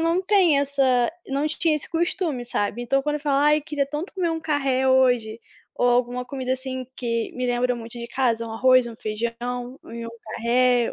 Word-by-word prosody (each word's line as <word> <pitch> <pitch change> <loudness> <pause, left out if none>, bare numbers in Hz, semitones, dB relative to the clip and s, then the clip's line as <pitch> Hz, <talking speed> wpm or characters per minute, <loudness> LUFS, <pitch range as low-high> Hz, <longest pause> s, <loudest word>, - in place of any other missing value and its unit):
não 335 +2 +2
tem 370 -8 +4
essa 270 -2 +2 0.2
não 280 +2 0
tinha 310 +1 +1
esse 300 - -8
costume, 330 -5 -1
sabe? 235 -1 -2
Então 270 +3 +1
quando 295 +1 0
eu - - -8
falo: 285 -2 +1
"Ai 300 +1 +4
queria 290 -1 -2
tanto 295 +6 -5
comer 355 -3 0
um 325 - -2
carré 275 -4 +1
hoje," 245 -4 +3 0.4
ou 245 - +2
alguma 245 +1 +1
comida 260 -1 -3
assim 260 0 -5
que 230 -2 -2
me 250 0 -2
lembra 245 0 +1
muito 230 -1 -9
de 235 - -6
casa, 235 -3 0
um 225 - -6
arroz, 255 +2 +4
um 230 - -10
feijão, 225 +2 -3 0.5
um 230 0 -7 0.2
carré, 245 +1 +2
255 Hz, 190 wpm, -24 LUFS, 240-295 Hz, 0.5 s, tem